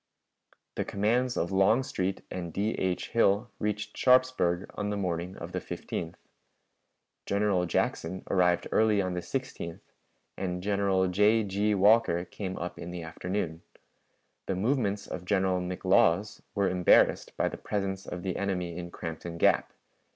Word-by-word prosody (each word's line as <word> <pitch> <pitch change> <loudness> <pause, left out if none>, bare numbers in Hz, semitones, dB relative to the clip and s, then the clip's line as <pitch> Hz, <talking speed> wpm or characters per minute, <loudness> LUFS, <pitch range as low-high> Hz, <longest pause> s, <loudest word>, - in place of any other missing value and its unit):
The - - +1
commands 120 +5 0
of 85 - -1
Longstreet 95 -1 +1
and 85 -2 -4
D. 105 +6 0
H. 95 -4 -2
Hill 110 0 +2
reached 105 0 -2
Sharpsburg 125 -9 +3
on 105 0 -3
the 105 - -2
morning 90 -1 -3
of - - -7
the - - -2
15th. 85 -1 -5 1.1
General 100 -3 +1
Jackson 90 +2 -1
arrived 90 -2 +2
early 110 -2 +3
on 95 -2 0
the 90 - -2
16th, 105 -9 -5 0.6
and 90 -1 -3
General 100 -2 +2
J. 105 +5 +3
G. 105 +1 0
Walker 100 -3 +4
came 95 +1 -6
up 90 +1 -5
in 85 - -6
the 90 -1 -6
afternoon. 85 0 -4 0.9
The 95 - 0
movements 105 -1 0
of 90 - -6
General 95 -1 +1
McLaws 90 +1 +2
were 100 -2 +2
embarrassed 90 -1 +3
by - - +2
the - - -5
presence 95 -2 -3
of 90 - -6
the 95 -2 -2
enemy 90 -4 -2
in 85 -1 -5
Crampton 85 0 -6
Gap. - - +3
95 Hz, 145 wpm, -29 LUFS, 90-105 Hz, 1.1 s, Walker